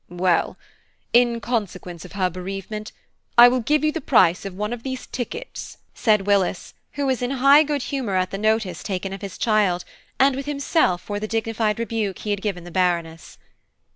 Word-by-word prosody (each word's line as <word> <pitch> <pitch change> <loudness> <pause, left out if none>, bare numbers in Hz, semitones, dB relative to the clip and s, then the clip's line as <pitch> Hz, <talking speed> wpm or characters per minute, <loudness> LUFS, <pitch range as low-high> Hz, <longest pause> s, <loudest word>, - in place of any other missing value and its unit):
"Well, 175 -1 +1 0.6
in 240 -1 +4
consequence 190 -7 -4
of 180 - -12
her 185 -2 0
bereavement, 195 +4 -6 0.5
I 240 +1 +11
will 250 +1 +2
give 295 +6 +1
you 305 - +3
the 325 +1 -4
price 185 -9 +3
of 195 -2 -6
one 210 +4 -3
of 240 - -6
these 260 0 -5
tickets," 245 - -6 0.2
said 215 -5 +2
Willis, 195 -3 0 0.2
who 285 0 -2
was 260 -3 0
in 245 - -1
high 275 +2 +6
good 290 -3 -1
humour 255 -9 -2
at 185 0 0
the 195 - -4
notice 215 -5 0
taken 195 -1 -4
of 195 - -7
his 200 -2 -7
child, 205 -6 +1 0.3
and 270 0 +4
with 275 +1 -5
himself 280 - +1
for 205 -1 -4
the 215 - -4
dignified 225 -1 -1
rebuke 225 -4 -2
he 210 - -4
had 200 -1 -1
given 195 -5 -3
the 175 - -10
Baroness. 170 -3 -1
210 Hz, 190 wpm, -23 LUFS, 185-245 Hz, 0.6 s, I